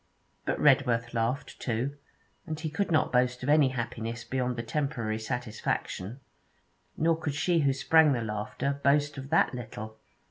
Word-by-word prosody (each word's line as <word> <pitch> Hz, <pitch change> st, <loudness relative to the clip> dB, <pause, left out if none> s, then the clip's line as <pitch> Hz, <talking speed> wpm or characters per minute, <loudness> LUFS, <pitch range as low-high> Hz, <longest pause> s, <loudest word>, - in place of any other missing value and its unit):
But -, -, -1 dB
Redworth 125 Hz, -5 st, +3 dB
laughed 115 Hz, +3 st, -2 dB
too, 125 Hz, +4 st, -2 dB, 0.5 s
and 155 Hz, -1 st, -4 dB
he 155 Hz, -1 st, -3 dB
could 200 Hz, +5 st, -1 dB
not 155 Hz, -2 st, +2 dB
boast 125 Hz, 0 st, +2 dB
of 130 Hz, -, -2 dB
any 150 Hz, -2 st, +6 dB
happiness 115 Hz, -2 st, -4 dB
beyond 125 Hz, -1 st, -1 dB
the 115 Hz, -, -3 dB
temporary 115 Hz, -4 st, -2 dB
satisfaction, 115 Hz, -1 st, -3 dB, 0.8 s
nor 165 Hz, +1 st, +3 dB
could 160 Hz, -3 st, -3 dB
she 170 Hz, +3 st, +2 dB
who 140 Hz, -3 st, +3 dB
sprang 155 Hz, +2 st, +5 dB
the 120 Hz, -2 st, -1 dB
laughter 110 Hz, +6 st, -3 dB
boast 145 Hz, 0 st, +2 dB
of 135 Hz, 0 st, -8 dB
that 160 Hz, -, +3 dB
little. 110 Hz, -2 st, -7 dB
130 Hz, 155 wpm, -29 LUFS, 115-145 Hz, 0.8 s, any